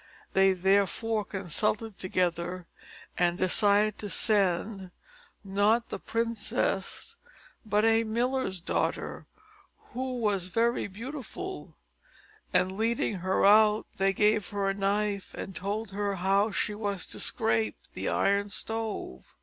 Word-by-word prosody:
They 190 0 +5
therefore 200 +4 +1
consulted 205 +3 -2
together, 180 -1 -1 0.5
and 175 -1 +2
decided 205 +2 +3
to 205 - -5
send, 195 -1 +1 0.5
not 205 +4 +2
the - - -5
princess, 230 - -2 0.5
but 210 -1 +2
a 225 0 +4
miller's 235 -4 -1
daughter, - - -2 0.7
who 255 +1 -3
was 205 -6 0
very 230 +5 +1
beautiful; 265 - -7 0.7
and 185 +1 +1
leading 225 -2 0
her 185 +2 +1
out, 210 +1 +6
they 195 0 +3
gave 210 +1 +2
her 200 -1 -2
a - - -2
knife, 200 0 -1
and 195 - -6
told 205 +2 -3
her 200 0 -1
how 195 +3 +2
she 210 +1 -1
was 205 -3 -3
to - - -4
scrape 110 -2 0 0.2
the - - -2
Iron 200 +1 +1
Stove. 225 - -4
205 Hz, 120 wpm, -29 LUFS, 190-225 Hz, 0.7 s, out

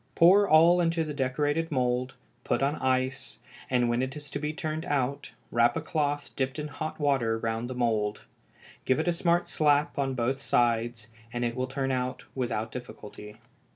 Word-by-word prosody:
Pour 195 +4 +6
all 170 +3 +6
into 165 -1 +1
the 155 -1 -5
decorated 145 +4 0
mould, 125 -1 0 0.3
put - - 0
on 140 +2 +1
ice, 130 -3 -1 0.3
and 125 -2 +2
when 120 +1 +1
it 130 +2 -3
is 145 -1 -8
to 145 - -3
be 150 +1 -2
turned 155 0 -4
out 140 0 -1 0.2
wrap 120 0 +3
a - - +1
cloth 145 -2 -2
dipped 130 +1 -2
in 150 0 -4
hot 155 +2 -5
water 135 -6 +1
round 115 +1 -3
the 130 - -5
mould; 110 -4 0 0.6
give 130 - +2
it 160 - -1
a 175 - +3
smart 170 0 +1
slap 150 0 +2
on 135 -1 0
both 130 +2 0
sides, 120 -3 +1 0.3
and 120 0 -2
it 120 0 -2
will 130 0 -1
turn 135 0 -2
out 125 0 -2
without 115 -4 -2
difficulty. 105 -3 -9
130 Hz, 185 wpm, -28 LUFS, 120-150 Hz, 0.6 s, Pour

